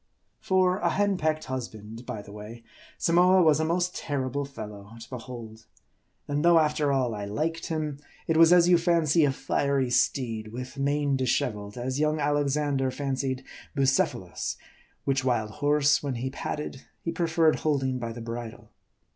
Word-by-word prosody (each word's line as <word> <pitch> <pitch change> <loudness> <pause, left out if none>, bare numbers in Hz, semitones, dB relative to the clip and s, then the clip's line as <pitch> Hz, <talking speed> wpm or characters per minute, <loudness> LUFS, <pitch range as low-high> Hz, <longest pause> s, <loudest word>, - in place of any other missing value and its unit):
For 185 -2 +2
a - - +1
hen 205 0 +1
pecked 155 -1 0
husband, 115 -2 -6
by 110 -5 -5
the 100 - -13
way, 105 +3 -9 0.3
Samoa 180 +2 +4
was 155 -2 +4
a - - +1
most 175 +2 0
terrible 140 -1 -2
fellow 105 -5 -9
to 115 - -11
behold. 115 -3 -8 0.6
And 145 +1 -1
though, 170 0 +6
after 150 -2 +2
all, 130 -4 +1
I 105 -1 -4
liked 155 +11 -2
him; 155 -3 -3 0.3
it 165 - 0
was 165 +1 +7
as 175 -1 +6
you 175 -1 +5
fancy 165 -2 +3
a 140 - +2
fiery 135 -1 0
steed 115 -4 +1
with 125 +4 -7
mane 140 0 +1
disheveled, 105 -5 -1
as 130 +3 -2
young 155 0 +1
Alexander 145 -2 +1
fancied 135 -1 -2 0.3
Bucephalus; 135 -1 0 0.5
which 135 -1 +1
wild 115 -4 0
horse, 145 +3 +2
when 140 -3 -3
he 130 +2 -3
patted, 140 -1 -5 0.2
he 165 - -1
preferred 165 -1 +2
holding 135 -4 0
by 115 -1 -4
the 115 +1 -8
bridle. 115 0 -7
140 Hz, 160 wpm, -27 LUFS, 120-155 Hz, 0.6 s, was